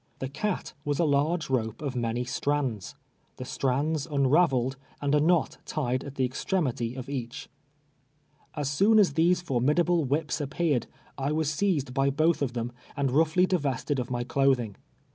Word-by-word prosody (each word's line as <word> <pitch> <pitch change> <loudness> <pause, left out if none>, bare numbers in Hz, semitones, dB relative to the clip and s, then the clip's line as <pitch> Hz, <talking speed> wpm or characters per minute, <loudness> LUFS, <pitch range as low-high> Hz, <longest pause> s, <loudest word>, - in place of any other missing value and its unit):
The 130 - -4
cat 185 +8 -3
was 145 -2 -1
a 170 - +2
large 155 +3 +1
rope 115 -4 -1
of 140 -4 -4
many 120 0 -1
strands 130 -7 -2 0.2
— - - -41
• - - -42
the 130 - -6
strands 140 +4 -1
unraveled, 135 -3 +2 0.2
and 145 0 0
a 150 - +5
knot 165 0 +2
tied 130 -4 -2
at 140 -1 -8
the 130 - +1
extrem 175 +7 -1
ity 120 -1 -3
of 130 -2 -6
each. 125 -4 -5 1.1
As 145 -2 -2
soon 200 +10 +4
as 195 -9 +5
these 170 +4 +3
formidable 160 +5 +2
whi]:»s 150 +3 -1
appeared, 145 -3 0 0.3
I 135 +1 0
Avas 155 0 0
seized 150 -6 0
by 135 0 +2
both 155 +4 +2
of 130 -4 -1
them, 120 0 -3 0.3
and 140 -2 +1
roughly 160 +5 +3
divested 145 -6 -1
of 125 - -3
my 120 -1 -1
clothing. 130 -4 +1
140 Hz, 175 wpm, -27 LUFS, 130-160 Hz, 1.1 s, a